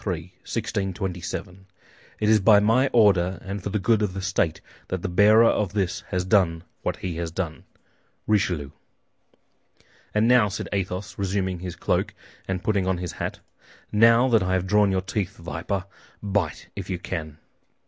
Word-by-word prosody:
3, 90 -5 -1 0.2
1627 95 -3 -4 0.5
"It 105 - 0
is 110 0 +5
by 105 +1 +6
my 115 +6 +3
order 100 -7 +3
and 100 +1 -4
for 100 - -4
the 105 - -1
good 110 +2 +2
of 100 -3 -1
the 95 - -3
state 95 -4 0 0.3
that 95 -2 -4
the - - 0
bearer 105 +5 +6
of 105 -4 +1
this 95 -4 -1
has 90 0 -2
done 90 -5 +2 0.2
what - - -1
he 90 -3 -5
has 85 -1 -3
done. 80 -1 -5 0.6
"RICHELIEU" 90 -9 +1 1.4
"And 105 +2 +3
now," 120 -4 +5
said 100 - -5
Athos, 95 0 -3
resuming 95 -2 -1
his 90 -1 -6
cloak - - -1 0.3
and 95 -1 -3
putting 100 -4 +1
on 95 -1 +1
his 90 -1 -4
hat, - - -5 0.5
"now 115 +3 +5
that 115 -3 +4
I 95 0 0
have 95 -1 +1
drawn 105 0 +3
your 95 -1 +1
teeth, 95 +1 -3
viper, 90 +3 -4 0.4
bite 100 -5 -2
if - - -6
you 90 - -1
can." 80 -4 -5
95 Hz, 170 wpm, -24 LUFS, 90-105 Hz, 1.4 s, by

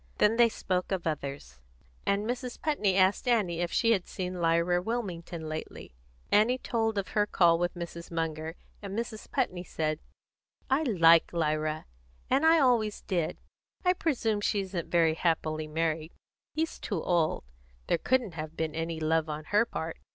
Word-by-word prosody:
Then 220 +2 +4
they 235 -1 +6
spoke 185 -4 -2
of 190 -3 -1
others, 140 - -4 0.5
and 200 +1 +1
Mrs. 245 0 -4
Putney 215 -11 +1
asked 190 +5 +3
Annie 195 -8 +2
if 175 - -1
she 230 - +3
had 195 -5 +1
seen 180 -2 -4
Lyra 170 +2 +2
Wilmington 180 -7 -4
lately. 155 - -7 0.4
Annie 225 +5 +4
told 225 -4 -1
of 195 - -2
her 210 -1 +1
call 170 -4 +4
with 175 +1 -1
Mrs. 170 -1 -7
Munger, 160 -1 -3 0.3
and 200 0 -5
Mrs. 230 -2 -5
Putney 185 -10 -1
said: 155 -3 -2 0.7
"I 270 +3 +4
like 170 - +5
Lyra, 155 -1 -1 0.5
and 275 +5 +4
I 325 +1 +7
always 240 -7 +2
did. 175 -5 -1 0.5
I 360 - +5
presume 235 - 0
she 205 0 +1
isn't 185 -3 -4
very 165 -2 +4
happily 155 -2 0
married; 160 +1 -1 0.4
he's 320 +1 -2
too 190 -7 -3
old; 170 -3 +1 0.4
there 170 - +1
couldn't 250 -8 +1
have 155 0 -6
been 160 -1 -1
any 165 0 -3
love 160 0 +1
on 150 0 -4
her 210 +3 +5
part. 160 -5 -4
175 Hz, 165 wpm, -29 LUFS, 160-220 Hz, 0.7 s, I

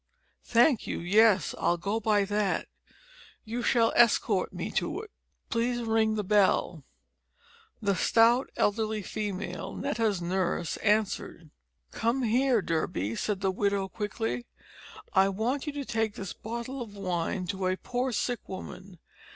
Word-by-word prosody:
"Thank 240 +1 +3
you. - - -3
Yes, 200 0 +4
I'll 175 - +2
go 200 +6 -1
by 210 -2 +2
that. 205 0 0 0.8
You 230 +2 -3
shall 230 -1 +3
escort 215 -4 +3
me 185 +3 -5
to 340 +4 -1
it. 435 -2 -12 0.4
Please 240 +1 0
ring 220 -1 +2
the 210 - -1
bell." 190 -5 +2 1.0
The 200 -1 +2
stout 230 +7 +4
elderly 215 0 0
female 195 -3 -4
Netta's 220 -4 0
nurse 175 -1 -1
answered. 205 -6 -1 0.4
"Come 235 +3 0
here, 240 -1 +2
Durby," 115 - -1
said 205 - -2
the 190 0 +1
widow 200 0 0
quickly; 125 - -3 0.7
"I 195 +1 +5
want 240 +9 -2
you 295 - -2
to 285 -1 -4
take 220 -3 -1
this 195 -2 -6
bottle 235 +4 -6
of 215 -4 -8
wine 180 0 -2
to 190 -1 -1
a 185 0 0
poor 250 +4 -2
sick 245 +1 -2
woman. 190 0 -8
210 Hz, 140 wpm, -28 LUFS, 190-230 Hz, 1.0 s, I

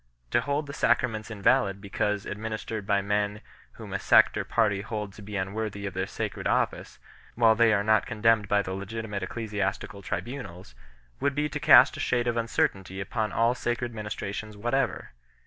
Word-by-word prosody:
To - - +3
hold 145 +2 -1
the 140 - -8
sacraments 110 -6 +1
invalid 105 -1 +2
because 100 0 -2
administered 110 -1 -5
by 100 -1 +2
men 105 +1 -1 0.3
whom - - -9
a - - -1
sect - - +5
or - - -1
party 105 -4 +1
hold 105 -2 -5
to 105 - -12
be 105 +1 -8
unworthy 100 +1 -3
of 100 - -4
their 95 +1 -2
sacred - - -4
office, - - -1 0.4
while 115 -1 +5
they 115 0 +4
are 100 -1 +2
not 110 0 +3
condemned 115 -2 +2
by 100 0 +2
the 95 - -5
legitimate 105 +1 -5
ecclesiastical 100 -1 -3
tribunals, 95 - -6 0.5
would 140 -1 0
be 150 +1 +1
to 150 - -4
cast 130 -1 +7
a - - -7
shade 120 -1 +1
of 120 -1 0
uncertainty 95 -4 -1
upon 105 +2 -2
all 115 +1 +2
sacred 120 -1 -2
ministrations 105 0 -5
whatever. 120 +5 -1
105 Hz, 175 wpm, -27 LUFS, 100-115 Hz, 0.5 s, cast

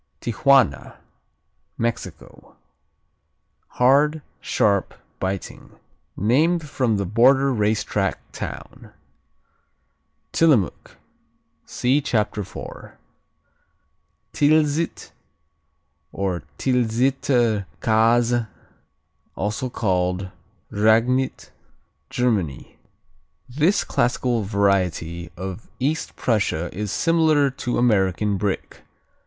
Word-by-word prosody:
Tijuana 120 - +2 0.8
Mexico 115 0 -5 1.2
Hard; 145 +4 +4 0.2
sharp; 100 -2 0 0.2
biting; 95 0 -5 0.4
named 150 - +2
from 125 -6 0
the 100 - -1
border 130 +7 +4
race 110 -1 +1
track 95 -2 -1
town. - - -8 1.4
Tillamook 140 - +1 0.7
see 130 +4 +1
Chapter 110 -6 -1
4. - - -10 1.4
Tilsit, 150 +2 +1 1.0
or 95 -4 -2 0.2
Tilsiter 120 -3 +1
Käse, 115 +1 +2 0.9
also 110 +6 -2
called 90 -4 -1 0.4
Ragnit 115 +5 +1 0.6
Germany 110 - -1 0.7
This 150 +10 +1
classical 120 -1 0
variety 90 -4 0
of 95 +3 -7
East 150 +5 -2
Prussia 100 -7 -1
is 105 0 -3
similar 155 -3 +2
to 125 -2 -3
American 105 -3 +2
Brick. 100 -1 -3
115 Hz, 70 wpm, -22 LUFS, 100-135 Hz, 1.4 s, Hard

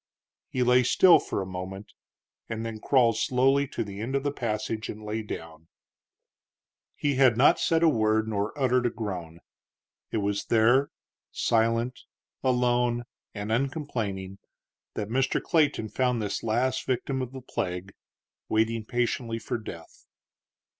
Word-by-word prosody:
He 125 - 0
lay 125 +1 +5
still 175 +8 +6
for 100 - -3
a - - -6
moment, 95 +2 -7 0.6
and 115 0 -4
then 115 -1 -5
crawled 120 -2 +3
slowly 135 +3 +2
to - - -3
the 100 -1 -7
end 125 +5 -3
of 135 - 0
the 145 - 0
passage 110 -3 -3
and 110 0 -7
lay 105 +1 -3
down. 80 -6 -8 1.3
He 145 -2 0
had 130 -4 +5
not 135 - +5
said 165 0 +2
a - - +6
word 110 -5 +2
nor 105 -1 -1
uttered 125 -2 +2
a - - +1
groan. 90 -8 -6 0.7
It - - -2
was 100 -1 -1
there, 120 +5 +4 0.4
silent, 115 +2 +1 0.4
alone, 125 -1 +2 0.3
and 105 +1 -4
uncomplaining, 110 -8 -2 0.6
that 105 - -3
Mr. 130 +3 +1
Clayton 150 -9 +1
found 125 0 0
this 105 -2 -2
last 120 +4 0
victim 130 +1 -1
of 125 -1 -4
the 135 - -7
plague 90 -5 -4 0.6
waiting 110 +1 +1
patiently 120 0 -1
for 115 - -4
death. 85 -6 -11
115 Hz, 145 wpm, -27 LUFS, 105-130 Hz, 1.3 s, still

